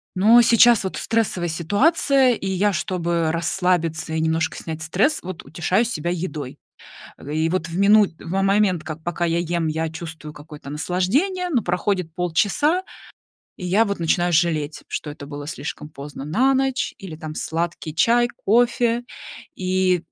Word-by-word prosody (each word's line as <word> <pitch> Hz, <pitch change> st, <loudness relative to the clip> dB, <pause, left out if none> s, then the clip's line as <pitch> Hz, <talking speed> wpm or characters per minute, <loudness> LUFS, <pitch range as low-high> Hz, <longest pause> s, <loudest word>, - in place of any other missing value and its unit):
Но 220 Hz, +6 st, +6 dB
сейчас 235 Hz, -1 st, +5 dB
вот 190 Hz, -, -4 dB
стрессовая 220 Hz, -6 st, 0 dB
ситуация, 250 Hz, -, +2 dB
и 195 Hz, -, -5 dB
я, 190 Hz, +2 st, +1 dB
чтобы 170 Hz, -1 st, -1 dB
расслабиться 165 Hz, -1 st, 0 dB
и 160 Hz, -, 0 dB
немножко 160 Hz, 0 st, 0 dB
снять 160 Hz, -1 st, -6 dB
стресс, 195 Hz, -, +1 dB
вот 185 Hz, -1 st, -7 dB
утешаю 180 Hz, +7 st, 0 dB
себя 175 Hz, -7 st, -2 dB
едой. 160 Hz, -6 st, -5 dB, 0.6 s
А, -, -, -16 dB
г 145 Hz, -, -6 dB
и 160 Hz, +1 st, +1 dB
вот 180 Hz, -1 st, -1 dB
в 165 Hz, -, -5 dB
минут 205 Hz, -1 st, +5 dB
в -, -, -10 dB
момент, 195 Hz, -3 st, +2 dB
как 160 Hz, 0 st, -7 dB
пока 175 Hz, 0 st, -2 dB
я 170 Hz, 0 st, 0 dB
ем, 170 Hz, -1 st, -1 dB
я 160 Hz, +1 st, -1 dB
чувствую 160 Hz, -1 st, -8 dB
какое-то 150 Hz, -1 st, -11 dB
наслаждение. 195 Hz, -, 0 dB
Но 260 Hz, -8 st, +1 dB
проходит 180 Hz, -2 st, -2 dB
полчаса, 205 Hz, -, +1 dB, 0.8 s
и 180 Hz, -, -8 dB
я 195 Hz, +6 st, +3 dB
вот 200 Hz, -3 st, -3 dB
начинаю 175 Hz, +1 st, +1 dB
жалеть, 155 Hz, -3 st, 0 dB
что 150 Hz, -, -4 dB
это 145 Hz, -1 st, -9 dB
было 145 Hz, 0 st, -7 dB
слишком 150 Hz, 0 st, -6 dB
поздно 140 Hz, -2 st, -9 dB
на 245 Hz, -, +2 dB
ночь 265 Hz, -1 st, 0 dB
или, 190 Hz, -5 st, -8 dB
там, 155 Hz, -1 st, -7 dB
сладкий 165 Hz, -1 st, -3 dB
чай, 235 Hz, +8 st, +3 dB, 0.2 s
кофе. 240 Hz, +1 st, +2 dB, 0.5 s
И, 185 Hz, -1 st, +1 dB
175 Hz, 160 wpm, -22 LUFS, 160-210 Hz, 0.8 s, Но